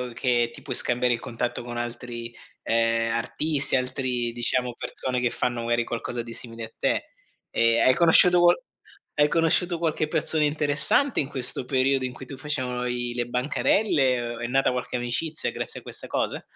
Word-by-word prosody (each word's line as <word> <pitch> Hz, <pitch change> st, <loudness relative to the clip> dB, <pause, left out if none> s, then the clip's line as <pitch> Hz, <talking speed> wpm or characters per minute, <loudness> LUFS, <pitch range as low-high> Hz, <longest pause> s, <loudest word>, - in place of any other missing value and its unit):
che 120 Hz, -2 st, +1 dB
ti -, -, -13 dB
puoi -, -, -4 dB
scambiare 125 Hz, 0 st, +3 dB
il 115 Hz, -, -2 dB
contatto 120 Hz, +1 st, -4 dB
con 120 Hz, 0 st, -6 dB
altri 120 Hz, 0 st, -6 dB, 0.3 s
ehm 115 Hz, 0 st, +1 dB
artisti, 140 Hz, +4 st, -1 dB
altri 125 Hz, -2 st, -1 dB
diciamo 120 Hz, +1 st, -1 dB
persone 125 Hz, -1 st, -2 dB
che 120 Hz, -1 st, +1 dB
fanno 120 Hz, -1 st, -2 dB
magari 120 Hz, 0 st, 0 dB
qualcosa 120 Hz, 0 st, -4 dB
di 115 Hz, -1 st, -9 dB
simile 115 Hz, -1 st, -5 dB
a 110 Hz, -, -7 dB
te. -, -, +1 dB, 0.5 s
E 115 Hz, 0 st, +3 dB
hai 130 Hz, +2 st, +5 dB
conosciuto 175 Hz, +2 st, +5 dB
qual 175 Hz, 0 st, +6 dB, 0.6 s
hai 145 Hz, -, +6 dB
conosciuto 170 Hz, +1 st, +2 dB
qualche 155 Hz, -2 st, 0 dB
persona 155 Hz, 0 st, +2 dB
interessante 150 Hz, -, +2 dB
in 135 Hz, -, 0 dB
questo 130 Hz, -2 st, 0 dB
periodo, 130 Hz, 0 st, +1 dB
in 125 Hz, -, -4 dB
cui 130 Hz, -, -10 dB
tu 135 Hz, -, -8 dB
facevano 130 Hz, -4 st, -2 dB
i 120 Hz, 0 st, -2 dB
le 120 Hz, -1 st, -1 dB
bancarelle 130 Hz, -, +1 dB, 0.2 s
o -, -, -10 dB
è 120 Hz, -, -3 dB
nata 135 Hz, +1 st, +2 dB
qualche 125 Hz, 0 st, -4 dB
amicizia 150 Hz, +7 st, -2 dB
grazie -, -, -5 dB
a -, -, -25 dB
questa -, -, -5 dB
cosa? -, -, -2 dB
125 Hz, 180 wpm, -25 LUFS, 120-145 Hz, 0.6 s, qual